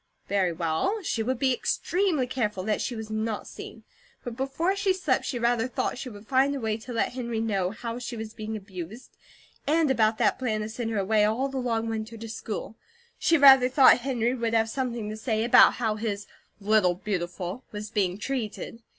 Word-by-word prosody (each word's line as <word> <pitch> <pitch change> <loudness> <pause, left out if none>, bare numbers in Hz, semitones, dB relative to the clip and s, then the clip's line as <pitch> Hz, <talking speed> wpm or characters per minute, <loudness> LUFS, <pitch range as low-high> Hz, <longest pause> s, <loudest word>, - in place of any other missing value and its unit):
Very 190 -3 +1
well, 170 - -1
she 230 - -1
would 255 +3 -1
be 260 +1 +2
extremely 350 +1 0
careful 215 -7 -2
that 210 +1 0
she 245 - -3
was 220 -1 -7
NOT 215 0 -2
seen; - - -10 0.4
but 240 -2 -6
before 275 +9 -1
she 395 -1 +2
slept 280 -8 0
she 250 - -2
rather 235 0 +1
thought 250 0 -2
she 255 - -5
would 205 -2 -12
find 275 +1 +3
a - - -3
way 220 -3 -1
to 230 +3 -10
let 230 - 0
Henry 235 -3 -3
know 200 -5 0
how 230 +3 -5
she 240 -1 -6
was 220 0 -6
being 215 0 -5
abused, 195 +3 -9 0.5
and 310 -1 +3
about 220 -3 +2
that - - +2
plan 220 -5 -1
to 215 - -4
send 225 +1 -4
her 225 - -2
away 210 +2 +2
all 230 +6 +1
the 270 - -5
long 230 -2 -1
winter 225 0 -4
to 225 +1 -8
school. 220 -1 -5 0.4
She 330 - +4
rather 270 -3 +8
thought 260 -1 +6
Henry 245 -2 0
would 230 -2 -1
have 225 0 +2
something 240 -4 -3
to - - -5
say 220 -1 -1
about 235 - +7
how 220 -3 -1
his 210 -2 -3 0.3
"Little 205 -3 +3
Beautiful" 180 +2 -4
was 210 0 -6
being 190 -4 0
treated. 230 -1 -4
225 Hz, 200 wpm, -27 LUFS, 215-255 Hz, 0.5 s, rather